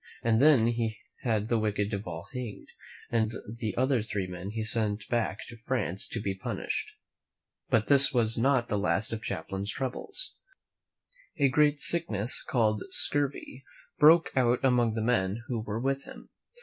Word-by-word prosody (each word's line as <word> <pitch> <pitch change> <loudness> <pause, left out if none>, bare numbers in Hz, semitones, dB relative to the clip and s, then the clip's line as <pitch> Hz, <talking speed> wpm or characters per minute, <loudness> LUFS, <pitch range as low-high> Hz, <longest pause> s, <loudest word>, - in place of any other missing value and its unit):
He 115 - +1
then 120 -3 +5 0.5
had 110 -3 0
the 115 -1 +1
wicked 105 -1 -1
Duval 90 -5 -5
hanged, 125 -5 -7 0.4
and 110 -2 +2 0.3
the 115 -2 -4
other 130 -1 +2
three 100 -3 -3
men 90 +1 -7
he 110 +1 -3
sent 105 -2 -1
back 115 -4 -1
to 120 - -11
France 100 -8 -2
to 115 - -4
be 100 -2 -2
punished. 95 - -4 0.8
But 110 -1 +2
this 140 -1 +7
was 115 -3 +1
not 125 0 +2
the 105 - -1
last 105 +2 0
of 110 0 -5
Champlain's 100 +2 -3
troubles. 135 - -2 1.0
A 140 -2 +3
great 145 +2 +3
sickness 120 -10 +1
called 110 -4 +1
scurvy 140 -2 0 0.4
broke 160 +3 +6
out 125 0 +2
among 120 -4 +2
the 110 - -1
men 110 -2 0
who 120 -2 -3
were 110 0 -4
with 135 +2 -1
him. - - -13
115 Hz, 155 wpm, -29 LUFS, 105-130 Hz, 1.0 s, this